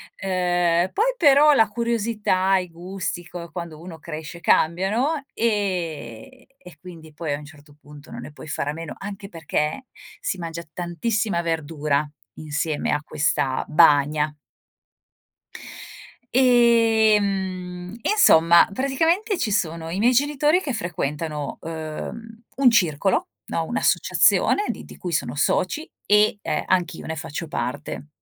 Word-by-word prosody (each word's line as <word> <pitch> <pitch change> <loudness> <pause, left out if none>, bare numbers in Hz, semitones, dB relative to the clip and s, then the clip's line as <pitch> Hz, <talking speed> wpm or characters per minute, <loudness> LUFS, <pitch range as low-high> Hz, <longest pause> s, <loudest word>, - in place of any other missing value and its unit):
ehm, 175 -2 +1
poi 485 +5 +2
però 295 -1 +6
la 225 -5 +4
curiosità, 210 -4 0
i 180 -1 -3
gusti 175 +1 -5
q 170 -1 -9
quando 170 -3 -7
uno 175 -2 -9
cresce 160 +2 -8
cambiano, 195 - +2 0.2
ehm, 185 - -3
e 180 -3 -15
quindi 165 -3 -12
poi 155 -1 -3
a 145 - -2
un 150 - -11
certo 145 -1 -17
punto 150 0 -14
non 120 - -7
ne 140 +4 -9
puoi 150 - -12
fare 145 -1 -3
a - - -6
meno, 165 -1 -7
anche 195 0 -7
perché 160 - -2 0.3
si 190 - -3
mangia 170 -1 -6
tantissima 180 +2 -1
verdura 155 -3 -1 0.3
insieme 155 0 -2
a 150 - 0
questa 140 -3 0
bagna. 150 -1 +4 2.0
E, 235 -4 +5
mhmm, 185 -2 -4
insomma 170 - +5
praticamente 325 - 0
ci 220 - -1
sono 165 -5 -1
i 175 +4 -4
miei 240 +4 +4
genitori 295 +6 +2
che 275 -8 -3
frequentano, 155 -6 -3
uhm, 165 +8 -7 0.2
un 265 -3 +5
circolo, 190 - +1 0.2
no, - - -2
un'associazione 415 - +2
di - - -5
di - - -13
cui 175 -2 -5
sono 130 -4 -1
soci 185 - 0
e, 210 0 +3
ehm, 150 - -2
anch'io 180 -3 -1
ne 160 - -4
faccio 155 +1 -6
parte. 145 +3 -5
175 Hz, 135 wpm, -23 LUFS, 155-220 Hz, 2.0 s, però